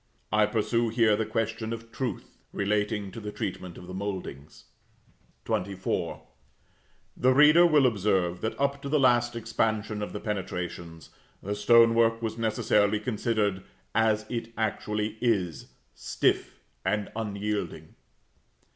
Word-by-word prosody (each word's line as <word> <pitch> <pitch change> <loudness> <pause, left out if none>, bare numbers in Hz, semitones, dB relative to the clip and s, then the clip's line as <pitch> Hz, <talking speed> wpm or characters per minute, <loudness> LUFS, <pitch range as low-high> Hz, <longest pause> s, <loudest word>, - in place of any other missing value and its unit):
I 105 +1 +4
pursue 115 +1 0
here 110 -2 +3
the 110 +1 -2
question 115 0 -2
of 115 0 -7
truth, 120 -2 -5 0.2
relating 105 0 -1
to 115 - -8
the 105 -1 -6
treatment 90 -3 -5
of - - -10
the 90 - -9
mouldings. 95 -7 -6 0.8
XXIV. 95 0 -2 0.9
The 130 +1 +3
reader 150 +4 +7
will 150 -4 +4
observe 95 -6 +1
that, 110 - -3
up 140 0 0
to 140 - -5
the 150 +1 +2
last 120 -2 +3
expansion 110 -2 -1
of 105 - -4
the 105 - -5
penetrations, 90 -5 -5 0.3
the 100 - -2
stone 115 +3 +5
work 115 0 +3
was 110 -1 -3
necessarily 105 -2 +2
considered, 105 -3 -1 0.3
as 110 -1 +2
it 115 -1 -4
actually 105 0 -2
is, 100 -9 0 0.3
stiff, - - -1 0.2
and 100 +2 -1
unyielding. 105 -1 -3
110 Hz, 130 wpm, -27 LUFS, 100-115 Hz, 0.9 s, reader